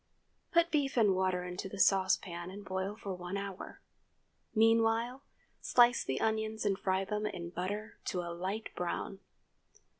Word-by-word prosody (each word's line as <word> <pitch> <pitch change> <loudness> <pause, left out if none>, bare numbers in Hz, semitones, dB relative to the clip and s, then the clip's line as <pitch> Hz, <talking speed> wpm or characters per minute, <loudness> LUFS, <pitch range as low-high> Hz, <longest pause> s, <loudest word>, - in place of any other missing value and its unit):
Put 340 0 +4
beef 280 -4 +1
and 210 -4 +5
water 185 -1 +1
into 180 +2 -5
the 200 - -7
saucepan 185 -3 +2
and 200 +2 -9
boil 190 +2 -2
for 200 -3 -5
one 180 +2 -4
hour. 195 -1 -6 0.7
Meanwhile, 225 +3 +3 0.4
slice 240 -1 +5
the 130 - -2
onions 220 0 0
and 195 -2 +1
fry 190 0 +1
them 210 +1 -1
in 175 -4 -5
butter 205 +5 -4
to 180 -4 -1
a 170 -1 -5
light 190 +6 -3
brown. 180 +2 -3
200 Hz, 150 wpm, -33 LUFS, 185-220 Hz, 0.7 s, and